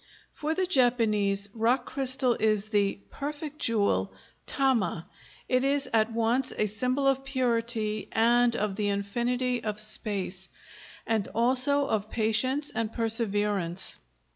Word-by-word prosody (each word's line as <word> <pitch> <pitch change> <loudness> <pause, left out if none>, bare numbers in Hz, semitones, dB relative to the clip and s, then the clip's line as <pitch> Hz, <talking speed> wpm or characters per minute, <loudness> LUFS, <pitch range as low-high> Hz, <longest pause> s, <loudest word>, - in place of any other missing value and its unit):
For 310 +1 -3
the 375 - +1
Japanese, 220 - +2
rock 240 +3 +1
crystal 260 -2 +1
is 215 -1 +1
the 205 -2 +1
"perfect 295 +1 -6
jewel," 200 - +1 0.4
tama; 235 - 0 0.4
it 255 0 +1
is 280 0 +1
at 220 0 +2
once 230 +3 +1
a 215 - +2
symbol 250 +6 0
of 270 0 +2
purity 230 -5 -1
and 235 +1 +3
of 200 -2 -2
the 210 -1 0
infinity 240 +5 -1
of 210 -1 -3
space, 200 -3 -1 0.6
and 220 -3 0
also 260 +4 +3
of 215 -5 -2
patience 245 +7 +1
and 225 -1 -2
perseverance. 205 -6 -1
230 Hz, 125 wpm, -28 LUFS, 210-260 Hz, 0.6 s, and